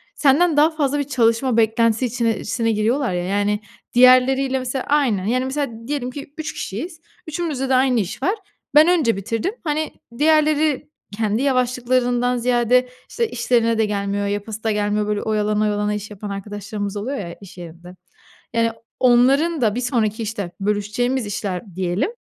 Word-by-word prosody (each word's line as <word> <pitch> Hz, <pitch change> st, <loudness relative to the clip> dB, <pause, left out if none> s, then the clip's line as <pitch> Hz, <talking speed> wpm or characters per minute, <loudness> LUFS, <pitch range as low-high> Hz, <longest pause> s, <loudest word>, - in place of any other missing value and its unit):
senden 300 Hz, +3 st, +3 dB
daha 300 Hz, +2 st, +6 dB
fazla 290 Hz, -2 st, 0 dB
bir -, -, +1 dB
çalışma 245 Hz, -2 st, +1 dB
beklentisi 230 Hz, +1 st, +2 dB
içine 230 Hz, -3 st, -1 dB
sine 225 Hz, +1 st, 0 dB
giriyorlar 225 Hz, +3 st, 0 dB
ya, 175 Hz, 0 st, -1 dB
yani, 205 Hz, +2 st, 0 dB, 0.3 s
diğerleriyle 255 Hz, +2 st, +5 dB
mesela 255 Hz, +1 st, -3 dB
aynı, 235 Hz, -10 st, +1 dB
yani, 255 Hz, +2 st, +1 dB
mesela 260 Hz, -5 st, -4 dB
diyelim 270 Hz, -3 st, -2 dB
ki, 280 Hz, +1 st, -9 dB
3 315 Hz, -, -4 dB
kişiyiz, 320 Hz, -, -6 dB, 0.3 s
3'ümüzde 300 Hz, -5 st, -3 dB
de 265 Hz, -, +3 dB
aynı 255 Hz, -2 st, +3 dB
iş 200 Hz, +5 st, -4 dB
var. 390 Hz, +9 st, +2 dB, 0.4 s
Ben 305 Hz, +2 st, +8 dB
önce 315 Hz, -10 st, +3 dB
bitirdim, 230 Hz, -, -2 dB
hani, 310 Hz, -1 st, -2 dB, 0.2 s
diğerleri 305 Hz, -1 st, +2 dB, 0.3 s
kendi 215 Hz, +1 st, 0 dB
yavaşlıklarından 250 Hz, -1 st, +1 dB
ziyade, 245 Hz, +1 st, +2 dB, 0.2 s
işte, 470 Hz, -1 st, -1 dB
işlerine 235 Hz, -, +1 dB
de 220 Hz, -, +3 dB
gelmiyor, 200 Hz, -1 st, -2 dB
yapası 205 Hz, +2 st, -4 dB
da 220 Hz, -, +1 dB
gelmiyor, 210 Hz, 0 st, 0 dB
böyle, 210 Hz, -1 st, -1 dB
oyalana, 210 Hz, -1 st, 0 dB
oyalana 210 Hz, 0 st, 0 dB
iş 210 Hz, 0 st, -5 dB
yapan 205 Hz, 0 st, -7 dB
arkadaşlarımız 205 Hz, +1 st, -5 dB
oluyor 255 Hz, +7 st, -3 dB
ya, 170 Hz, -6 st, -6 dB
iş 195 Hz, -2 st, -13 dB
yerinde. 175 Hz, +1 st, -11 dB, 0.6 s
Yani, 230 Hz, 0 st, +2 dB, 0.3 s
onların 270 Hz, +6 st, +4 dB
da 215 Hz, -3 st, +2 dB
bir 245 Hz, -, -2 dB
sonraki, 230 Hz, -3 st, 0 dB
işte, 205 Hz, -5 st, -4 dB
bölüşeceğimiz 210 Hz, +5 st, -1 dB
işler 195 Hz, -2 st, -5 dB
diyelim 185 Hz, -, -1 dB
235 Hz, 160 wpm, -21 LUFS, 210-265 Hz, 0.6 s, Ben